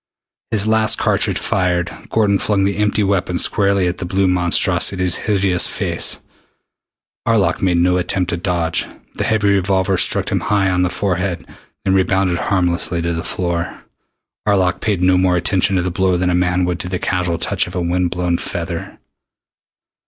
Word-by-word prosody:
His 105 -2 0
last 110 0 +2
cartridge - - +1
fired, 90 -2 0 0.2
Gordon 100 -3 +2
flung 100 -2 +1
the 100 +1 0
empty 105 0 +1
weapon 95 -2 0
squarely 100 -1 +2
at 90 - -3
the - - -4
blue 95 +2 +1
monstrosity's 90 0 +2
hideous 95 -3 +2
face. - - -2 1.1
Arlok 115 -4 +2
made 90 -2 +2
no 90 +1 +3
attempt 90 0 -1
to 85 - -1
dodge. 85 -2 -1 0.3
The - - -3
heavy 105 -2 +1
revolver 95 -1 +1
struck - - +1
him - - +1
high 100 -2 +1
on 90 0 +1
the 90 - +1
forehead, 90 -2 -2 0.4
then 95 - +2
rebounded 95 -2 +1
harmlessly 90 -3 0
to 85 0 -1
the 80 +1 -3
floor. 85 -2 -3 0.6
Arlok 95 -3 +2
paid 100 -5 -1
no 90 0 +4
more 90 -1 +2
attention 95 +2 +1
to 90 - +1
the 90 - -2
blow 90 +1 +1
than 90 0 0
a - - 0
man 90 0 +1
would 90 -1 -2
to 90 - -5
the 90 - -2
casual 90 -2 -1
touch - - -1
of 90 - -9
a - - -1
wind 90 +1 0
blown 90 -1 -1
feather. - - -5
90 Hz, 175 wpm, -18 LUFS, 90-100 Hz, 1.1 s, no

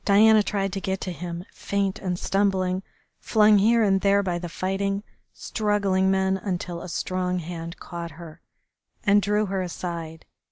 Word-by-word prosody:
Diana 215 +2 +6
tried 195 -2 -1
to 195 - -3
get 190 0 -2
to 185 - -3
him, 175 +1 -6
faint 200 -1 -2
and 180 -2 -2
stumbling, 190 -1 +1 0.4
flung 210 -2 +5
here 230 +3 +4
and 195 -2 +3
there 200 0 +3
by 175 -2 -1
the 175 0 -6
fighting, 195 +3 -2 0.3
struggling 200 -3 0
men, 190 0 +2
until 180 -3 -4
a 180 - -7
strong 180 +1 -1
hand 170 0 -6
caught 170 -1 -6
her 165 -2 -11 0.6
and 205 0 +5
drew 210 +1 +1
her 190 -1 -2
aside. 170 -2 -5
190 Hz, 160 wpm, -25 LUFS, 175-200 Hz, 0.6 s, Diana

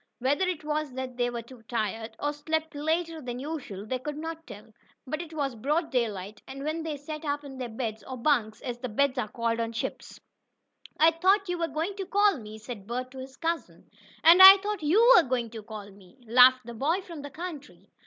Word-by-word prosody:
Whether 285 +9 +1
it 355 -4 -3
was 300 -2 -2
that 260 -1 -5
they 245 0 0
were 235 -1 -5
too 240 0 -14
tired, 225 -1 -3
or 290 0 -2
slept 315 +2 -2
later 320 +2 -1
than 245 -2 -5
usual, 255 -9 -6
they 255 +3 -2
could 295 +3 -5
not 325 +1 -6
tell. 205 +1 -10 0.4
But 310 +5 -3
it 335 -2 -9
was 285 -4 -2
broad 300 +9 -1
daylight, 210 -4 -2
when 300 +4 -3
they 315 -2 -4
sat 305 +2 -7
up 290 -1 -2
in 270 -2 -9
their 250 -2 -4
beds, 220 -1 -4
or 260 - -6
"bunks," 235 -5 +1
as 245 -4 -5
beds 255 +3 0
are 230 - -1
called 230 +1 -2
on 230 0 -2
ships. 230 - -5 0.8
"I 320 +1 +7
thought 380 +4 +2
you 355 -1 -2
were 335 - 0
going 330 +5 -3
to 385 -2 -4
call 405 -4 +3
me," 215 -1 -9
said 215 -3 -9
Bert 250 +2 -4
to 265 - -10
his 265 +1 -10
cousin. 335 0 -4 0.3
"And 340 +3 +8
I 385 +1 +12
thought 410 -1 -4
you 430 +12 +6
were 355 - +8
going 240 -3 -1
to 225 -1 -7
call 210 -1 -9
ME," 195 +3 -19
laughed 250 +2 +6
the 235 - -7
boy 310 - 0
from 335 -5 -9
the 285 - -7
country. 305 -1 -8
275 Hz, 215 wpm, -28 LUFS, 235-320 Hz, 0.8 s, I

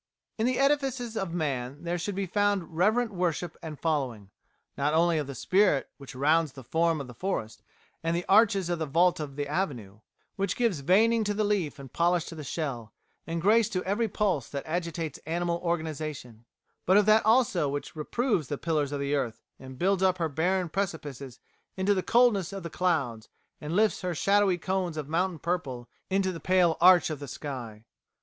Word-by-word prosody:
'" - - -57
"In 225 - +2
the 255 - +1
edifices 270 -4 +1
of 195 -5 -2
Man 140 -4 -3
there 175 +1 -2
should 200 +3 -3
be 195 0 -1
found 200 -3 0
reverent 215 +6 +2
worship 175 -2 -2
and 155 -3 -7
following, 130 -11 -2 0.4
not 145 +2 0
only 165 0 +3
of 145 - -3
the 140 - -6
Spirit 185 -6 +2
which 135 -2 -11
rounds 155 +2 +2
the 135 - -11
form 165 +4 +1
of 140 - -5
the 125 - -11
forest, 120 - -4 0.4
and 170 +2 -1
arches 200 -2 +4
the 165 -2 -2
vault 170 +5 +3
of 145 -3 -6
the 145 0 -3
avenue, 130 - -3 0.4
which 195 0 -1
gives 230 -10 +1
veining 220 +9 +3
to 205 0 -1
the 215 - +1
leaf 205 -7 0
and 135 -2 -11
polish 175 0 +2
to - - -8
the 155 -2 -7
shell, 130 -7 -4 0.3
and 165 0 -3
grace 220 +2 +4
to 185 - -2
every 205 +4 0
pulse 195 - -1
that 140 -1 -5
agitates 165 -2 -3
animal 170 +1 -1
organisation 155 -8 -4 0.4
but 190 +2 +6
of 205 - +5
that 215 +1 +5
also 220 - +3
which 145 +4 -5
reproves 180 - -1
the 145 - -3
pillars 150 -3 -1
of 145 - -3
the 140 +1 -1
earth 130 -6 -2 0.2
and 130 -1 -10
builds 190 +3 +1
up 185 -1 +3
her 165 -2 -1
barren 180 +5 0
precipices 145 -8 -4 0.4
into 190 +2 +2
the 190 - 0
coldness 230 -5 +3
of 195 -2 -6
the 170 - -6
clouds, 135 -12 -1 0.3
and 155 +3 -4
lifts 215 +1 +2
her 180 -2 -2
shadowy 200 +1 +3
cones 185 -2 -2
of 150 -2 -4
mountain 175 +3 0
purple 140 -8 -3 0.2
into 190 0 +1
the 170 - -7
pale 180 -3 +3
arch 180 -2 +6
of 150 - -4
the 145 - -7
sky." 120 -6 -7
170 Hz, 195 wpm, -28 LUFS, 145-195 Hz, 0.4 s, but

